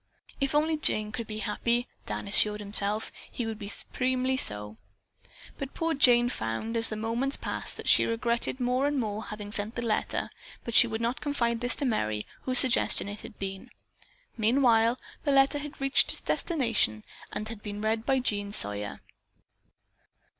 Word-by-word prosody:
If 275 +1 -1
only 310 +1 +2
Jane 215 -7 +1
could 230 -1 -5
be 215 - -6
happy, 235 +3 -1 0.2
Dan - - -4
assured 210 +1 +6
himself, 205 +1 -2 0.2
he 240 - -4
would 220 -1 -5
be 205 - -7
supremely 255 +4 -1
so. 105 - -1 0.8
But 275 0 -6
poor 330 0 -1
Jane 245 -4 +5
found, 115 - -4
as 230 0 +4
the 215 - -4
moments 230 +6 -2
passed, - - -4
that - - -8
she - - +5
regretted 235 +2 -2
more 250 +2 +1
and 290 -1 -1
more 215 -2 -3
having 210 -1 -8
sent 210 +2 -2
the 235 - -3
letter, 220 -2 -2 0.3
but 235 - -6
she 235 - +8
would 220 0 -4
not 235 +3 -2
confide 235 -5 -1
this 245 0 +3
to 285 - -2
Merry, 110 - -1 0.2
whose 255 -1 +4
suggestion 255 -5 +6
it 205 +1 -7
had 220 - -12
been. 195 +5 -6 0.7
Meanwhile 230 0 +3 0.3
the 285 - +1
letter 275 +1 +4
had 295 +1 -8
reached 275 +1 +3
its - - -6
destination 230 - 0 0.3
and 215 - -4
had 225 -2 -8
been 205 -1 -6
read 220 +1 -1
by 265 +2 +1
Jean 205 -5 -1
Sawyer. 105 - -2
230 Hz, 175 wpm, -28 LUFS, 210-255 Hz, 0.8 s, she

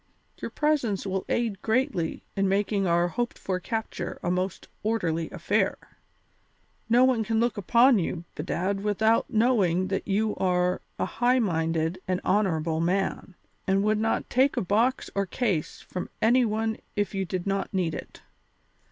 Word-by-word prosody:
Your - - -3
presence 280 -11 0
will 190 -1 -2
aid 225 -4 -1
greatly 220 - 0
in 195 -1 +1
making 200 0 +1
our 175 +1 +2
hoped 240 +7 -2
for 185 -1 -2
capture 220 -3 -4
a 175 - 0
most 185 +1 -2
orderly 170 -7 -1
affair; - - 0 1.1
no 240 +2 +5
one 250 -4 +2
can 225 +1 0
look 240 0 +1
upon 235 +4 +4
you, 170 -1 -3
bedad, 185 +5 -2
without 220 +2 +2
knowing 200 -6 +2
that 195 - -2
you 210 +2 +1
are 180 -1 +1 0.2
a - - 0
high 245 +2 +2
minded 165 -4 0
and 185 -1 0
honourable 165 -6 +1
man, 185 +1 -1 0.3
and 195 +1 +2
would 215 0 +2
not 225 +1 0
take 265 +3 +2
a - - +2
box 230 +7 +1
or 200 -1 0
case 190 -7 -1
from 180 - -6
any 245 +3 +4
one 220 0 -1 0.2
if 205 0 -1
you 195 -1 -1
did 185 -1 -4
not 195 0 -1
need 180 -4 0
it. - - -8
195 Hz, 160 wpm, -27 LUFS, 180-225 Hz, 1.1 s, no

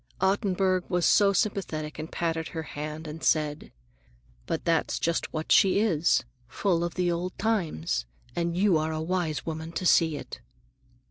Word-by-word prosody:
—Ottenburg 190 -2 +1
was 175 -2 +1
so 200 -2 +5
sympathetic 165 -7 -2
and 155 +1 -6
patted 165 -1 -2
her 160 -1 -5
hand 150 +1 -6
and 155 +1 -8
said, 150 -1 0 0.8
"But 160 - -2
that's 165 -2 +1
just 170 0 -1
what 155 0 -4
she 195 0 +6
is, 175 -7 +2 0.2
full 170 - 0
of 175 - -3
the 180 -1 +1
old 175 +2 -3
times, 165 - -1 0.3
and 170 0 -1
you 190 -4 +4
are 160 +1 -1
a 155 - -2
wise 165 -2 -2
woman 160 0 -5
to 180 - -3
see 160 -3 +4
it." - - -9
170 Hz, 160 wpm, -27 LUFS, 155-185 Hz, 0.8 s, she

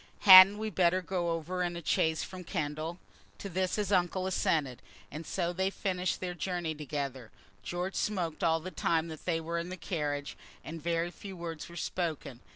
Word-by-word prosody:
"Hadn't 190 +1 +10
we 215 0 -3
better 185 0 +2
go 175 -1 -1
over 165 +2 -2
in 175 -1 -1
a 170 -2 -7
chaise 160 0 +1
from 185 -1 -8
Kendal?" 155 -1 -3 0.4
To - - -6
this 185 0 -1
the 205 -2 +1
uncle 180 +1 0
assented, 150 -8 0 0.3
and 155 +2 -7
so 175 -2 -1
they 190 +2 0
finished 185 -2 -2
their 180 -1 -3
journey 175 -1 -2
together. 140 -5 -5 0.3
George 180 +2 -3
smoked 175 -7 -2
all 165 0 +3
the 185 +3 -7
time 165 -2 0
that 160 -1 -9
they 165 -2 +1
were 170 +1 -3
in 170 +1 -5
the 185 - -6
carriage, 145 -5 -3 0.3
and 165 0 -7
very 170 +1 -1
few 195 0 -9
words 165 -2 -6
were 170 - -11
spoken. 160 -9 -3
170 Hz, 185 wpm, -31 LUFS, 160-185 Hz, 0.4 s, Hadn't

